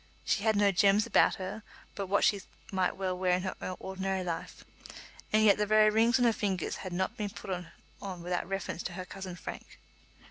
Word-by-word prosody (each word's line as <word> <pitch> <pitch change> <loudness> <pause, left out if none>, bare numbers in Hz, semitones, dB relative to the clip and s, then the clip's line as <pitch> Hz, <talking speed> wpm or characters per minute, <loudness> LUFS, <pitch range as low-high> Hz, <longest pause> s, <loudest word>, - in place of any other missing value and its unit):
She - - +1
had 220 0 +2
no 205 -1 +4
gems 200 +3 +4
about - - +4
her 190 +3 -6 0.3
but 200 -1 -4
what 200 +2 +2
she 200 -2 +3 0.3
might 185 -2 0
well 185 -1 -1
wear 180 0 +1
in 180 0 +1
her 185 -1 -4
ordinary 190 0 -3
life, 170 -2 -5 0.7
and 215 0 +4
yet 205 -1 +5
the 210 - +1
very 215 0 +5
rings 230 +3 +4
on 245 - +3
her 230 - +4
fingers 195 -5 -2
had 185 - -6
not 185 +2 -2
been 210 -1 -2
put 195 - -8 0.5
on 185 -3 -6
without 180 +1 -2
reference 195 -3 -3
to 180 - -5
her 185 +1 -6
cousin 185 -1 -7
Frank. 175 - -9
195 Hz, 205 wpm, -30 LUFS, 185-205 Hz, 0.7 s, yet